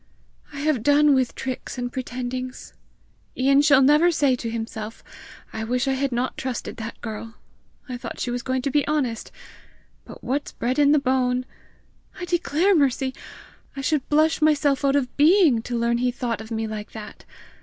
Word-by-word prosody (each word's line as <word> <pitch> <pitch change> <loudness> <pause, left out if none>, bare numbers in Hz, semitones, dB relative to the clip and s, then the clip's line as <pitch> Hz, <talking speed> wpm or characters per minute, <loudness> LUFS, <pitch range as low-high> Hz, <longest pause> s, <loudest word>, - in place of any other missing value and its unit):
I 280 -1 -6
have 300 -5 +1
done 290 +3 +5
with 260 -2 +1
tricks 260 0 -5
and 245 0 -4
pretendings! 255 0 -5 0.6
Ian 275 +2 +4
shall 290 -2 +5
never 300 +5 +5
say 285 -6 +2
to 235 -2 -5
himself, 225 -1 -6 0.5
'I 220 - -4
wish 250 +3 -1
I 270 - +2
had 270 0 -1
not 245 +2 -2
trusted 260 -2 -4
that 225 0 -7
girl! 225 0 -7 0.5
I 250 -2 -5
thought - - -7
she 245 - -2
was 245 0 -2
going 260 +1 -2
to 275 - -1
be 290 0 +1
honest! 265 -7 -1 0.7
But - - -13
what's 280 +3 -2
bred 250 +4 -1
in 290 -1 +5
the 300 - +5
bone 255 -2 +1 0.4
!' - - -22
I 360 - -4
declare, 345 +2 +1
Mercy, 270 -4 +1 0.6
I 275 - -4
should 290 -1 -1
blush 310 +2 +3
myself 290 -3 +2
out 275 0 +3
of 255 -3 -1
being 305 - +5
to 240 +1 -4
learn 235 0 +1
he 250 0 +1
thought 240 -3 -3
of 220 - -10
me 225 -1 -2
like 215 -1 -6
that! 215 -1 -9
260 Hz, 185 wpm, -23 LUFS, 240-290 Hz, 0.7 s, done